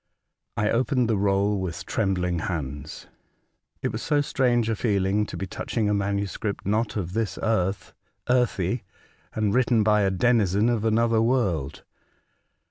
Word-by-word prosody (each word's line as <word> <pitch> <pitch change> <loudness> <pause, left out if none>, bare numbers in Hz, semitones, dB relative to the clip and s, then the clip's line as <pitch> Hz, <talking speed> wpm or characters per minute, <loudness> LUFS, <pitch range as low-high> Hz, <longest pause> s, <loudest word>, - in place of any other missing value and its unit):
I 105 0 +1
opened 125 0 +1
the 110 - +1
roll 100 0 +1
with 90 -3 -4
trembling 90 -4 0
hands. 75 -3 -5 0.8
It - - 0
was - - -4
so 150 - +1
strange 125 -5 +1
a 115 - 0
feeling 100 -1 +1
to - - -7
be 95 - -3
touch 95 - -6
ing 110 -2 +2
a - - +2
manuscript, 100 0 -2
not 105 +2 0
of 90 -3 -3
this 110 -4 -2
earth, 100 -3 -1 0.3
earthy, 120 -4 +1 0.5
and 105 -2 +1
written 120 -2 +3
by 105 0 +3
a 100 - +2
denizen 105 +1 +2
of 115 -2 0
another 115 0 +3
world. 95 - 0
105 Hz, 150 wpm, -25 LUFS, 95-115 Hz, 0.8 s, written